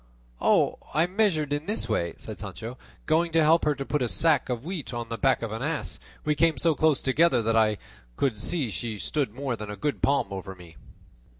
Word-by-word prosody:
"I 160 +2 +2
measured 180 -7 +1
in 145 +2 -3
this 215 +2 0
way," 85 -1 -1
said - - -8
Sancho; 115 +3 -6 0.3
"going 165 +2 +2
to 165 -1 +5
help 160 +2 +4
her 150 -1 +2
to 135 0 -5
put 150 0 -1
a 125 - 0
sack 140 - +2
of 120 -1 -2
wheat 165 -8 -5
on 120 -1 -4
the 115 - -3
back 135 -3 +2
of 115 - -3
an 110 +2 -4
ass, 150 +3 -2 0.3
we 150 - +3
came 165 +1 +2
so 165 -2 +3
close 155 -1 +2
together 130 -2 +3
that 115 +1 +1
I 110 -2 +3 0.4
could 130 - +1
see 135 +1 -2
she 110 +1 -4
stood 135 +2 -1
more 130 +1 -3
than 105 -2 -7
a 105 - -5
good 145 +8 -2
palm 140 0 +2
over 95 0 -6
me." 85 -2 -14
135 Hz, 215 wpm, -27 LUFS, 115-160 Hz, 0.4 s, to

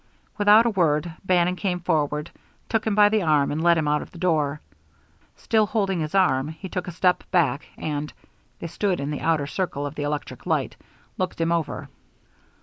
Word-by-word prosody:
Without 210 +2 +6
a 235 - +2
word, 165 -3 +1
Bannon 180 -1 +2
came 180 -2 -2
forward, 150 -3 -1 0.4
took 225 0 -1
him 215 - +1
by 205 0 +7
the 215 0 +1
arm, 150 -4 +2
and 150 +2 -2
led 170 -1 +5
him 155 -2 0
out 150 0 +1
of - - -9
the - - -14
door. 155 -5 0 0.8
Still 220 -2 +1
holding 195 -5 0
his 155 +3 -3
arm, 135 -8 +3
he 160 +5 -8
took 180 0 -4
a - - -4
step 180 +1 +1
back, 155 -6 +1
and 150 -1 -3 0.5
(they - - -8
stood 180 +2 -1
in 140 +1 -3
the 150 - -4
outer 160 -3 +1
circle 145 -2 -3
of 145 - -5
the 150 - -6
electric 145 0 -4
light) - - 0 0.4
looked 185 -2 -2
him 165 0 +1
over. 170 -3 -2
170 Hz, 195 wpm, -24 LUFS, 150-185 Hz, 0.8 s, by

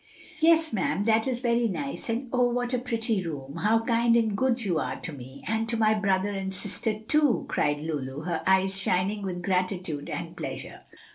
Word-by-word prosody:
"Yes, 325 -2 +4
ma'am, 200 0 0
that 220 +2 +3
is 250 -2 -1
very 235 -1 +2
nice; 275 +5 -4
and 240 +4 -1
oh, 250 -1 +3
what 245 +1 -1
a 250 - +2
pretty 230 -4 -1
room! 145 -3 -6
How 220 +5 +2
kind 230 0 +3
and 220 -3 +2
good 245 0 +1
you 175 -5 +1
are - - -3
to 165 - -6
me! 130 0 -10
and 225 +1 -1
to 230 - -1
my 215 -1 +4
brother 200 -1 +1
and 195 -1 -3
sister, 210 +3 -1
too!" 290 +2 +2
cried 145 0 0
Lulu, 145 -3 -4
her 165 0 -2
eyes 190 0 +3
shining 195 +2 0
with 180 -2 -4
gratitude 180 -5 -1
and - - -5
pleasure. - - -6
210 Hz, 195 wpm, -27 LUFS, 180-235 Hz, -, Yes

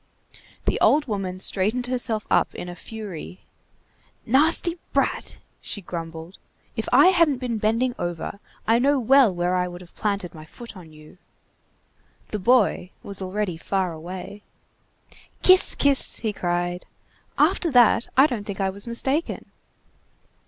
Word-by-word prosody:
The - - 0
old 295 +1 +4
woman 195 -5 -4
straightened 210 +7 +1
herself 245 -4 -2
up - - +2
in 175 - -6
a 175 - -7
fury. 190 -3 -8 0.8
"Nasty 325 +7 +2
brat!" - - -1 0.2
she - - -6
grumbled. 165 -1 -8 0.4
"If - - -3
I 365 - +7
hadn't 335 -7 +3
been 245 -3 -3
bending 230 +4 +1
over, 175 +3 -4 0.3
I 225 +1 +3
know 280 +2 +3
well 260 -1 +5
where 175 0 -1
I 180 0 0
would 175 0 -9
have 175 - -15
planted 200 -4 -2
my 155 - -11
foot 230 +8 -11
on 170 -4 -12
you." 155 +3 -16 1.1
The 210 - -3
boy 210 -3 +2
was 200 -1 -2
already 190 -2 -3
far 185 +1 -1
away. 180 +5 -8 1.0
"Kisss! 370 0 +6
kisss!" 280 -2 +2
he 220 -2 -1
cried. 175 -1 -2 0.5
"After 340 - +2
that, 245 -3 +4
I 270 - +8
don't 245 -8 -2
think 200 -1 -6
I 190 -1 0
was 200 +4 -7
mistaken!" 265 +7 -1
205 Hz, 145 wpm, -24 LUFS, 180-250 Hz, 1.1 s, I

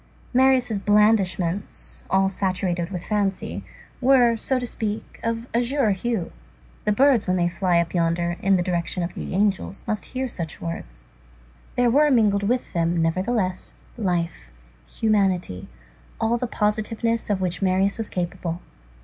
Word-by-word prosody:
Marius' 255 -4 +3
blandishments, 200 -3 +1
all 190 0 +3
saturated 185 -2 -1
with 180 -3 -5
fancy, 200 -3 -1 0.4
were, 250 -2 +5
so 260 +4 0
to 250 - -2
speak, 220 -2 -4
of 230 0 -2
azure 245 0 +2
hue. 200 -1 -2 0.5
The 210 - +3
birds 255 +1 +4
when 185 - +2
they 175 -1 +2
fly 175 0 +1
up 170 0 -1
yonder, 170 0 +1
in 195 0 +3
the 180 - +1
direction 175 0 -1
of 170 - -4
the - - -5
angels, 195 -1 0
must 215 -2 -1
hear 260 0 -3
such 170 -9 -5
words. - - -6 0.7
There 245 -1 +3
were 295 +4 +5
mingled 215 -6 +3
with 245 +5 -1
them, 170 0 +1
nevertheless, 185 +3 0 0.2
life, 170 - -2 0.4
humanity, 190 - 0 0.5
all 230 +2 +1
the 250 - -1
positiveness 225 +2 0
of 200 -2 +1
which 180 0 -2
Marius 195 +2 +2
was 225 - -2
capable. 175 -1 -3
195 Hz, 145 wpm, -24 LUFS, 175-230 Hz, 0.7 s, were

